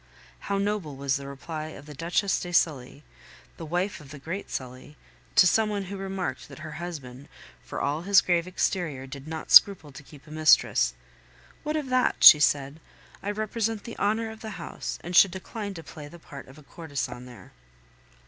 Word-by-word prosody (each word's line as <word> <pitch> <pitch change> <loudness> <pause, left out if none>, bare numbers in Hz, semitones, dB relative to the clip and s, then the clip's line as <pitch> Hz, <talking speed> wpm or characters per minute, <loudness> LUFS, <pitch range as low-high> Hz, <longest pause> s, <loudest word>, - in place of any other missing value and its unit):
How 200 - +1
noble 200 -7 -2
was 135 0 -1
the 140 0 -8
reply 155 +3 -6
of 145 -2 -11
the 150 - -10
Duchesse 175 +6 0
de 175 - -6
Sully, 145 -4 0 0.5
the 165 - -7
wife 180 +5 -2
of 145 - -14
the 145 - -9
great 170 +8 -6
Sully, 130 +3 -7 0.4
to - - +7
some 220 +4 +3
one 205 -1 -2
who 195 +1 -7
remarked 190 -7 -4
that - - -11
her 155 - -7
husband, 140 -6 -8 0.3
for - - -6
all 145 +3 -1
his 195 +2 +5
grave 175 -1 0
exterior, 175 -7 -2
did 135 +2 -10
not 160 0 -6
scruple 175 -7 +7
to 140 - -11
keep 145 0 -16
a 150 - -14
mistress. 155 0 +3 0.7
"What 305 0 -3
of 290 -4 -4
that?" 255 0 +1
she 150 - +11
said. 145 0 +1 0.4
"I 200 - -4
represent 215 +1 -2
the 230 - -8
honor 220 +2 0
of 220 0 -12
the 215 -3 -7
house, - - -6
and 175 +1 -5
should 195 - +8
decline 200 +2 -7
to 165 - -8
play 150 -3 -10
the 170 - -13
part 140 -4 -12
of 135 +3 -15
a 150 - -15
courtesan 140 -6 -6
there." 120 -2 -14
165 Hz, 195 wpm, -26 LUFS, 145-200 Hz, 0.7 s, she